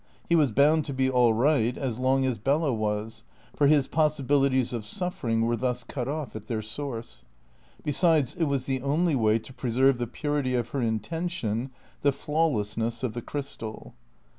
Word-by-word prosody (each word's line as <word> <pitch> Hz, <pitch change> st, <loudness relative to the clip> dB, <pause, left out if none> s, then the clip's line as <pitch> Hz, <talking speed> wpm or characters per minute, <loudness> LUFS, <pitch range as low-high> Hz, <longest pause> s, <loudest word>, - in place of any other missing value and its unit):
He 170 Hz, -, +3 dB
was 150 Hz, -5 st, +4 dB
bound 150 Hz, +6 st, +4 dB
to 140 Hz, -, -4 dB
be 130 Hz, 0 st, +1 dB
all 125 Hz, -2 st, +4 dB
right 120 Hz, 0 st, +2 dB
as 125 Hz, -4 st, -3 dB
long 130 Hz, +1 st, +2 dB
as 125 Hz, -5 st, -1 dB
Bella 140 Hz, +4 st, +1 dB
was; 110 Hz, +1 st, -3 dB, 0.3 s
for 145 Hz, -, +4 dB
his 145 Hz, -2 st, +4 dB
possibilities 140 Hz, -4 st, +2 dB
of 115 Hz, -3 st, -3 dB
suffering 120 Hz, -, -2 dB
were 120 Hz, +1 st, +1 dB
thus 125 Hz, 0 st, -2 dB
cut 125 Hz, 0 st, -4 dB
off 145 Hz, -3 st, -4 dB
at 110 Hz, -, -8 dB
their 110 Hz, -2 st, -2 dB
source. 115 Hz, -, -6 dB, 0.6 s
Besides, 150 Hz, -2 st, +2 dB
it 170 Hz, -2 st, 0 dB
was 140 Hz, -3 st, -1 dB
the 130 Hz, -1 st, -1 dB
only 155 Hz, +5 st, +1 dB
way 110 Hz, -3 st, +3 dB
to 115 Hz, +4 st, -10 dB
preserve 130 Hz, +1 st, +2 dB
the 120 Hz, -, -1 dB
purity 145 Hz, 0 st, -1 dB
of 120 Hz, -2 st, -1 dB
her 140 Hz, -, -2 dB
intention, 120 Hz, -, -2 dB, 0.3 s
the 140 Hz, -, +4 dB
flawlessness 120 Hz, -7 st, -1 dB
of 120 Hz, -4 st, -1 dB
the 120 Hz, -, -4 dB
crystal. 115 Hz, -5 st, -6 dB
130 Hz, 175 wpm, -27 LUFS, 115-145 Hz, 0.6 s, was